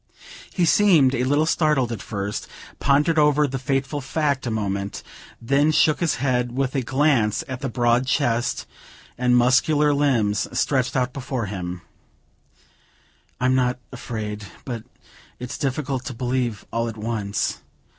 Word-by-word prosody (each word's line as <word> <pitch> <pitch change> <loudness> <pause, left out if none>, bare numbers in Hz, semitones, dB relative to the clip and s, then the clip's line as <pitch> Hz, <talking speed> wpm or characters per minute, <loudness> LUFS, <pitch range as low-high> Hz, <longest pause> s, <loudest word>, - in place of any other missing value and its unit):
He 180 - +1
seemed 165 -8 +5
a 125 -1 0
little 145 +4 +2
startled 150 -6 +2
at 110 -4 -4
first, 100 0 -4 0.3
pondered 150 +3 +3
over 150 0 +4
the 135 -1 -3
fateful 135 +2 -1
fact 140 -1 -1
a - - 0
moment, 100 -2 -3 0.4
then 140 +6 +2
shook 155 0 +3
his 170 -3 +1
head, 125 -2 0
with 135 -1 0
a 135 - 0
glance 130 -4 +2
at 130 -2 -5
the 135 -1 -3
broad 120 +1 +2
chest 120 -2 0 0.5
and 125 0 +3
muscular 145 +5 +3
limbs 120 -8 +1
stretched 130 -3 +1
out 130 -1 0
before 130 -3 -3
him: 90 -3 -5 1.6
"I'm 130 +1 +2
not 125 -1 +1
afraid, 105 -4 -5 0.2
but 120 -4 -5 0.5
it's 125 0 -6
difficult 135 -1 -2
to 130 - -5
believe 125 -3 -2
all 115 0 0
at 110 - -8
once. 105 -2 -2
130 Hz, 145 wpm, -23 LUFS, 115-140 Hz, 1.6 s, seemed